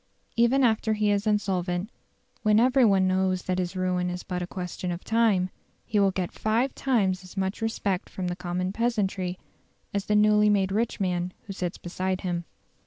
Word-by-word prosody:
Even 235 +4 +4
after 220 -2 +2
he 210 -1 +1
is 205 +1 0
insolvent, 190 -1 0 0.5
when 215 0 +4
every 255 +2 +4
one 195 -4 +4
knows 185 -1 +1
that 185 0 -1
his 180 +1 -2
ruin 180 -1 0
is 180 0 -5
but 180 -1 -4
a 175 - -3
question 180 0 -4
of 175 +1 -5
time, 215 -5 +2 0.3
he 210 - +1
will 200 -1 +5
get 185 -2 -2
five 230 +5 0
times 195 -8 +1
as 185 +2 -13
much 190 +3 -2
respect 205 -4 -1
from 185 - -5
the 175 - -2
common 180 +1 -3
peasantry 200 -6 -1 0.6
as 200 0 -1
the 210 - +2
newly 210 0 +5
made 195 -2 +2
rich 220 +4 0
man 180 -2 -1
who 195 - -6
sits 180 -2 -3
beside 185 +1 -3
him. 175 -2 -2
190 Hz, 185 wpm, -26 LUFS, 180-215 Hz, 0.6 s, will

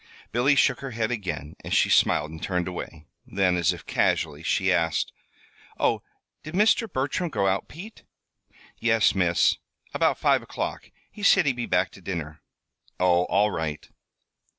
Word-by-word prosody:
Billy 130 +5 +3
shook 130 -2 +3
her 135 - -6
head 110 0 0
again 90 - -4
as - - -2
she - - +4
smiled 75 +1 +3
and 80 - -10
turned 90 -2 -1
away. 85 -3 -7 0.2
Then, 95 -2 +1
as 85 -2 +2
if - - -8
casually, 75 -1 0
she 95 +2 +1
asked: 80 -3 0 0.7
"Oh, - - +1 0.4
did 155 +3 -8
Mr. 215 +1 +3
Bertram 145 +6 -1
go 105 -9 -1
out, 95 0 0
Pete?" 200 +8 -11 0.8
"Yes, - - +3
Miss; - - +2 0.4
about - - +2
five - - +2
o'clock. - - -5 0.2
He 210 - -12
said 200 - +5
he'd 135 -3 +1
be 120 -1 -4
back 90 +1 +1
to 95 - -15
dinner." 80 -4 -5 0.6
"Oh! 90 -1 +3
All 105 +1 +2
right." 80 -4 -4
95 Hz, 160 wpm, -25 LUFS, 85-130 Hz, 0.8 s, said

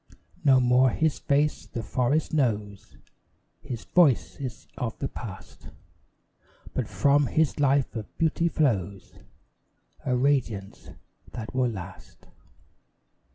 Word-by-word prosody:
No 135 -3 +6
more 125 +1 +4
his 155 +4 0
face 145 +1 0
the 115 -4 -5
forest 130 +9 0
knows; 105 -8 -1 0.6
His 120 -3 -6
voice 160 -9 +3
is 130 -3 -6
of 115 -3 -4
the 135 - -3
past; 100 -8 -9 1.0
But - - -2
from 140 0 +3
his 155 +1 +1
life 140 -2 +2
of 110 -2 -7
beauty 165 +1 +1
flows 100 - -1 0.9
A 125 -1 0
radiance 125 -7 -1 0.4
that 115 +1 -6
will 130 -1 +1
last. 95 -6 -10
130 Hz, 110 wpm, -26 LUFS, 110-145 Hz, 1.0 s, No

